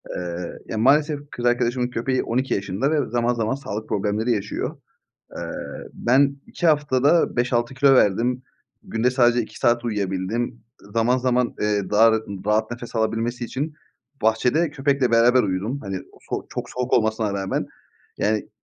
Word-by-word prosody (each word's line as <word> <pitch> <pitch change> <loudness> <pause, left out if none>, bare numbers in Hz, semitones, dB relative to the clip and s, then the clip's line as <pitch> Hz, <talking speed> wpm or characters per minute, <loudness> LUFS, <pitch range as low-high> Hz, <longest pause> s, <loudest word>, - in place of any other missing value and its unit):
Eee, 90 -1 -4
ya - - -4
maalesef 145 +5 +3
kız 120 - -5
arkadaşımın 120 0 +1
köpeği 125 +2 -1
12 130 +3 -1
yaşında 100 +8 -1
ve 150 -6 0
zaman 120 +1 +1
zaman 115 +2 -1
sağlık 110 -6 -6
problemleri 105 +4 0
yaşıyor. 105 -3 -2 0.6
Eee, - - -5 0.4
ben 140 +3 +2
2 175 - -2
haftada 145 0 +3
5-6 120 +1 0
kilo 135 0 +5
verdim. 125 +3 +2 0.4
Günde 115 +3 0
sadece 120 -1 +3
2 110 - -10
saat 120 -1 +2
uyuyabildim. 105 +3 -2 0.3
Zaman 115 +2 +3
zaman, 125 -1 +1
eee, 105 -2 0
daha 110 +2 +6
rat 110 0 +1 0.2
rahat 110 +1 +1
nefes 120 -1 -7
alabilmesi 115 +2 -1
için 145 +6 -4 0.5
bahçede 125 +9 +2
köpekle 140 -3 +1
beraber 120 +2 +5
uyudum. 100 +8 -2
Hani, 95 -2 -4
o - - -19
so - - -3
çok - - -5
soğuk 125 0 -3
olmasına 110 -2 +2
rağmen 95 -1 -2 0.5
yani 105 0 0
120 Hz, 150 wpm, -23 LUFS, 110-130 Hz, 0.6 s, daha